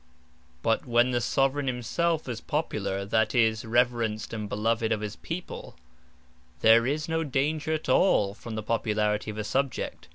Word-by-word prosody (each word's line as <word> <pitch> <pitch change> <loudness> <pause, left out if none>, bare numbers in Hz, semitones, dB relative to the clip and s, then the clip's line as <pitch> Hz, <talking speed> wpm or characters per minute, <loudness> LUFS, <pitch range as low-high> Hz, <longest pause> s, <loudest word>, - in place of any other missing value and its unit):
But 115 +3 +1
when 120 +1 +3
the 120 -1 +1
Soveraign 135 +5 +1
himselfe 150 +7 -1
is 115 -2 -4
Popular, 105 -10 -2
that 110 +2 +1
is, 110 -2 +3
reverenced 115 -2 0
and 105 -2 -4
beloved 115 +2 0
of 110 -1 0
his 105 0 -4
People, 170 +2 -7 0.9
there 115 +2 +6
is 150 +3 -1
no 160 0 0
danger 150 +2 -1
at 155 - -3
all 105 - +3
from 115 +1 -8
the 110 - -4
Popularity 105 -1 0
of 105 - -6
a 105 - -2
Subject. 135 +3 -2
115 Hz, 160 wpm, -27 LUFS, 110-140 Hz, 0.9 s, there